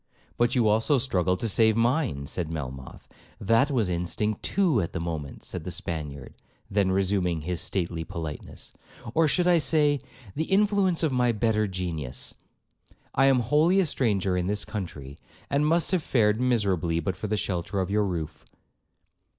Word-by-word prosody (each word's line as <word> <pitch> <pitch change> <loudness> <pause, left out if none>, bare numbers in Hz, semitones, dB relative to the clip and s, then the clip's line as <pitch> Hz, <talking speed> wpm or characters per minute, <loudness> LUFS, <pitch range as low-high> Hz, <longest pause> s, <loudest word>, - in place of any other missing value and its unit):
'But 120 +2 +1
you 120 -3 +3
also 110 +7 +3
struggled 90 -8 0
to 115 - 0
save 110 +1 +3
mine,' 120 - +1
said 80 +2 -4
Melmoth. 65 -4 -7 0.3
'That 115 +8 +3
was 120 -8 +1
instinct 90 +5 -1
too 175 - +1
at 85 - -4
the - - -3
moment,' 80 -4 -5
said - - -4
the - - -5
Spaniard; 75 -4 -4 0.4
then 100 -1 +2
resuming 95 -3 0
his 90 +3 -3
stately 85 -5 -2
politeness, 80 -3 -7 0.4
'or 165 +3 +4
I - - +3
should 175 +2 +3
say, 145 -1 +3 0.4
the 160 - -1
influence 195 -3 +2
of 155 - +2
my 125 -1 +2
better 110 -1 +1
genius. 80 -9 -4 0.8
I 135 - +4
am 135 -2 +4
wholly 155 - +3
a 190 - +3
stranger 100 - 0
in 90 0 -1
this 105 +1 -1
country, 75 -9 -7 0.3
and 145 +2 +2
must 165 +3 +2
have 185 -3 +2
fared 110 -5 +2
miserably 95 -9 +1
but 90 +2 -2
for 105 - -5
the 105 +1 -1
shelter 95 0 -2
of 95 0 -2
your 105 +1 +2
roof.' 85 -5 -5
105 Hz, 165 wpm, -26 LUFS, 85-130 Hz, 0.8 s, or